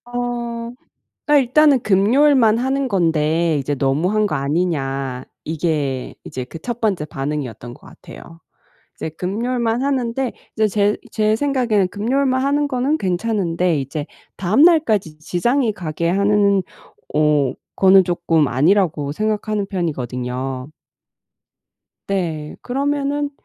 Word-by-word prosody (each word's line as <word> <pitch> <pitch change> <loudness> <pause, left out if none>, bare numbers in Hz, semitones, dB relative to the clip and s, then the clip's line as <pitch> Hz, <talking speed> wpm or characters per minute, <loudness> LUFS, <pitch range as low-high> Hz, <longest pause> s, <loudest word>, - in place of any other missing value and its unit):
어 240 -1 -4 0.7
일단은 275 +1 +4
"금요일만 225 +3 +4
하는 265 +2 0
건데 165 -4 +1
이제 145 +1 -2
너무 140 +7 0
한 215 0 +2
거 195 - -2
아니냐." 135 -4 -2 0.2
이게 150 -5 -2
이제 130 - -5
그 130 - -10
1 240 +7 -5
번째 195 -9 0
반응이었던 135 -6 -5
것 - - -18
같아요. 165 0 -13 0.6
이제 - - -3
금요일만 230 +7 -1
하는데 260 -2 -1 0.2
이제 220 -1 +2
제 205 0 +1
제 215 0 +1
생각에는 240 -8 +1
금요일만 260 +6 0
하는 285 +1 +1
거는 270 +4 0
괜찮은데 180 -4 0
이제 145 +3 -5 0.3
다음날까지 215 - +3
지장이 225 - 0
가게 170 -3 -3
하는 200 0 +3 0.5
오 150 -3 +2 0.2
거는 190 -1 +6
조금 165 -4 +1
아니라고 150 - +2
생각하는 215 +1 -1
편이거든요. 130 - -3 1.4
네. 165 -6 -3
그러면은 285 +2 -1
195 Hz, 265 characters per minute, -20 LUFS, 155-240 Hz, 1.4 s, 거는